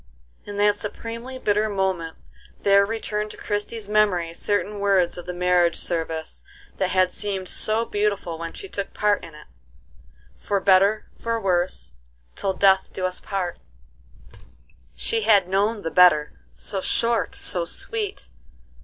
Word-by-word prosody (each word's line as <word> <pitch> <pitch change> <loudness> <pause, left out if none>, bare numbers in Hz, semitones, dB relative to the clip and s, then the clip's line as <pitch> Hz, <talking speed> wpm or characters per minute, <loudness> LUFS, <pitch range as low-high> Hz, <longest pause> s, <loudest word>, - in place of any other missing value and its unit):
In 205 0 -7
that 205 0 +3
supremely 230 +4 -6
bitter 215 -2 +1
moment 190 -5 -2 0.5
there 200 0 +5
returned 215 -1 -3
to - - -11
Christie's 210 +1 -3
memory 200 -6 +2
certain 205 +3 -1
words 195 -3 +2
of 175 0 -8
the - - -2
marriage 180 -1 +2
service 160 -2 -2 0.3
that 190 - 0
had 185 -1 +2
seemed 195 -3 -4
so 220 +4 0
beautiful 205 -6 -1
when 165 0 -5
she 395 - -6
took 200 - -5
part 210 -1 +2
in 165 -2 -10
it: 150 - -13 0.9
"For 200 -1 0
better 195 +3 +4
for 230 0 -1
worse, 180 - 0 0.4
till 195 -1 -1
death 190 0 +3
us 185 -1 -2
do - - -23
part." 185 -3 -2 1.4
She 225 - +1
had 205 -4 +4
known 205 +3 0
the 165 - -3
better, 155 -5 +5 0.2
so 195 -2 -4
short, 230 +4 0
so - - -1
sweet! 435 -4 -4
200 Hz, 145 wpm, -24 LUFS, 180-210 Hz, 1.4 s, there